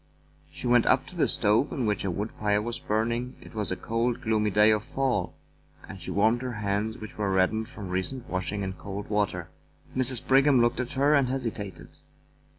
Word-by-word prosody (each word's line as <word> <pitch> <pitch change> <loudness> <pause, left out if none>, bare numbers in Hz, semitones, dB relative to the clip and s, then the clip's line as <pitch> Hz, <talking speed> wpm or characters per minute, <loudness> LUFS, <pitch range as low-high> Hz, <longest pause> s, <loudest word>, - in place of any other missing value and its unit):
She - - -8
went 120 -1 +4
up - - +4
to - - -11
the - - +2
stove 105 +6 +2
in 130 - -2
which 105 -1 0
a 100 - -1
wood 100 +5 -3
fire 105 -1 0
was 120 +2 -3
burning 115 +4 -1
— - - -24
it - - -14
was 105 -3 -3
a - - 0
cold, 115 +4 -1
gloomy 110 -4 +1
day 105 +2 +5
of 105 -1 +1
fall 130 -7 -1 0.3
— - - -21
and - - -9
she - - -6
warmed 110 +4 +2
her 130 -1 -4
hands, 105 +1 -2
which 110 0 -9
were 100 -2 0
reddened 105 +4 +1
from 105 -8 -8
recent 95 +8 -2
washing 95 +2 -2
in 95 -1 -3
cold 100 +2 -7
water. 90 -5 -1 0.4
Mrs. 130 -1 +2
Brigham 135 0 +5
looked 120 +1 +2
at 125 -1 -3
her 140 +3 +3
and 140 -3 +4
hesitated. 115 -7 -5
110 Hz, 210 wpm, -27 LUFS, 105-125 Hz, 0.4 s, day